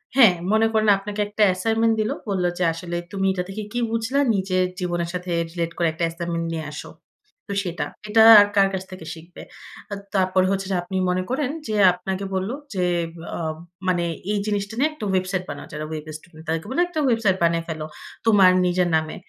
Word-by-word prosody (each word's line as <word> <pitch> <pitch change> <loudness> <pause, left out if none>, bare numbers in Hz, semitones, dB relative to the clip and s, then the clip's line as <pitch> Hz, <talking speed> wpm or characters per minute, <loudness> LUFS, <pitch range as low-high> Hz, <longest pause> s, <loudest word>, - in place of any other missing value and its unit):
হ্যাঁ, 230 -9 +7 0.2
মনে 220 +1 +4
করেন 215 -1 +3
আপনাকে 205 +1 -4
একটা 210 +1 +1
অ্যাসাইনমেন্ট 225 +5 +2
দিল। 215 - -1 0.2
বলল 190 -3 0
যে, 180 - 0
"আসলে 175 +1 -5
তুমি 195 -1 -1
এটা 180 -1 -2
থেকে 210 +2 -5
কি 245 - -2
বুঝলা? 230 +4 0 0.2
নিজের 185 -1 +1
জীবনের 175 -2 -2
সাথে 180 0 -4 0.2
রিলেট 170 -1 -2
করে 170 - +2
একটা 160 +2 -4
অ্যাসাইনমেন্ট 170 0 -3
নিয়ে 160 -1 -4
আসো।" 150 - -8 0.6
তো 200 - -4
সেটা। 175 -1 -3 0.2
এটা 220 +1 +4 0.2
আর 205 - +6
কার 195 -1 +5
কাছ 190 -1 -3
থেকে 185 -3 -9
শিখবে? 165 +2 -12 0.5
আর 205 - -3 0.2
তারপরে 185 -1 +3
হচ্ছে 195 -1 -1
যে, - - +1
আপনি 190 +2 -4
মনে 180 +1 0
করেন 265 +1 -1 0.2
যে 215 - -2 0.2
আপনাকে 190 +2 -4
বলল 190 +2 -1 0.3
যে, 185 - 0 0.5
আ - - -5 0.5
মানে 175 -2 +1 0.3
"এই 210 - +1
জিনিসটা 205 0 -2
নিয়ে 290 +5 +3
একটা 305 -8 -7
ওয়েবসাইট 185 0 0
বানাও।" - - -6
যারা 150 +1 -4
ওয়েব 155 -1 -5
স্টুডেন্ট, 160 0 -16
তাদেরকে 160 0 -2
বললো 270 +7 +1
"একটা 350 -3 -4
ওয়েবসাইট 225 -7 +2
বানিয়ে 170 0 +2
ফেলো, 155 -2 -4 0.4
তোমার 200 -5 +6
নিজের 180 0 +2
নামে।" 155 0 -1
185 Hz, 195 wpm, -23 LUFS, 175-210 Hz, 0.6 s, হ্যাঁ